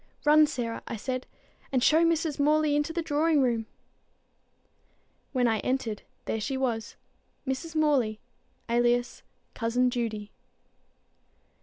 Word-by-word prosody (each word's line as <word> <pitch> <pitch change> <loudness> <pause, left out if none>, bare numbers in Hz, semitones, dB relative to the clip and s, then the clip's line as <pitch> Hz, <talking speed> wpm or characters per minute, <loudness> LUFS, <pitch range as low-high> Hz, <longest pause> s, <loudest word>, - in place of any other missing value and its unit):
"Run, 305 +1 +7
Sarah," 240 -5 -3
I - - -4
said, 255 +3 -4 0.4
"and 255 -2 +1
show 320 +4 +5
Mrs. 325 -3 +1
Morley 300 0 +3
into 295 +2 0
the 335 0 -2
drawing 310 0 +2
room." 230 -3 0 1.6
When 250 -2 +2
I 220 -2 +1
entered, 240 -5 -2 0.2
there 220 - -2
she 265 +5 -2
was, 235 -4 -2 0.5
Mrs. 300 +5 -4
Morley, 270 -9 +2 0.5
alias 240 +1 +1 0.3
Cousin 245 +2 +1
Judy. 220 -4 -3
255 Hz, 120 wpm, -28 LUFS, 230-300 Hz, 1.6 s, Run